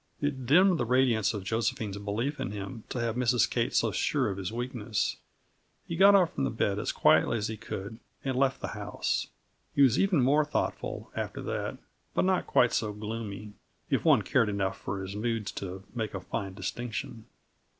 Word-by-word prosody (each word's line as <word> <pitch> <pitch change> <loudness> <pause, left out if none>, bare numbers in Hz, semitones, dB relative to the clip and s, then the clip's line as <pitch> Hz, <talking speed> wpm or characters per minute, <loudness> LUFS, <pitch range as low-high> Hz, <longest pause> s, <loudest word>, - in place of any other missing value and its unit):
It 135 -4 -2
dimmed 180 +4 +5
the - - +1
radiance 120 -3 +3
of 105 -4 -5
Josephine's 110 -1 -1
belief 115 +8 -2
in 135 - -2
him, 105 +3 -6
to 125 - -3
have 115 -1 -1
Mrs. 125 -3 +3
Kate - - 0
so - - +3
sure - - +1
of 100 - -5
his 95 0 -3
weakness. 120 -2 -2 0.7
He 170 - -3
got 200 +3 +7
up 180 -4 +4
from 135 - -2
the 135 - +1
bed 105 -3 0
as - - -1
quietly 120 - +4
as 105 0 -2
he 110 - -3
could 105 +1 -6 0.3
and 135 -1 0
left 135 0 +1
the - - -3
house. - - -2 0.5
He 140 - +6
was 130 -4 +4
even 185 -9 +3
more 145 +4 +4
thoughtful, 150 - -3
after - - -4
that, - - -3 0.4
but - - +3
not 185 0 +1
quite 125 - +4
so 105 -2 0
gloomy 105 -1 -6 0.4
if - - +2
one - - +5
cared 110 - +2
enough 95 -2 -1
for 95 -1 -3
his 95 +1 -6
moods 115 -1 -2
to 95 0 -6
make 110 -4 -3
a - - -2
fine 95 +1 -4
distinction. 115 +4 -5
115 Hz, 190 wpm, -29 LUFS, 105-130 Hz, 0.7 s, got